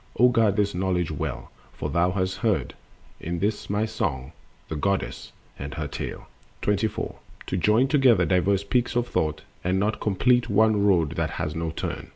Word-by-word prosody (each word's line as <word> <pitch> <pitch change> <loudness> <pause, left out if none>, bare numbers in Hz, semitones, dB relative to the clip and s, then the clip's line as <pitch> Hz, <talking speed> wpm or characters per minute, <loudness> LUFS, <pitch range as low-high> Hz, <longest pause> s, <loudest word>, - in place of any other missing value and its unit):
O 125 +1 +6
guard 115 -5 +3
this 100 -1 +1
knowledge 90 -2 0
well, 75 - -4 0.2
for - - -4
thou 85 +1 +3
hast 95 0 -1
heard 110 -5 0 0.5
In 85 +1 -3
this 105 +4 -2
my 105 +2 +1
song 85 - -3 0.4
the 80 - -4
Goddess 100 +6 -2 0.3
and 70 0 -6
her 75 -1 -3
tale. 70 - -5 0.4
The 105 - +2
Speculative 105 +2 0
Thinker. - - -3
24. - - -9 0.3
To 95 - -2
join 105 +8 +3
together 130 - +4
diverse 95 +2 +2
peaks 120 +5 0
of 120 0 +1
thought, 80 -9 -1 0.2
And 90 +1 +1
not 105 +2 0
complete 120 +5 +2
one 105 0 +3
road 85 -7 +3
that - - 0
has 75 - -2
no 80 0 -2
turn. 80 - -5
100 Hz, 190 wpm, -25 LUFS, 85-110 Hz, 0.5 s, O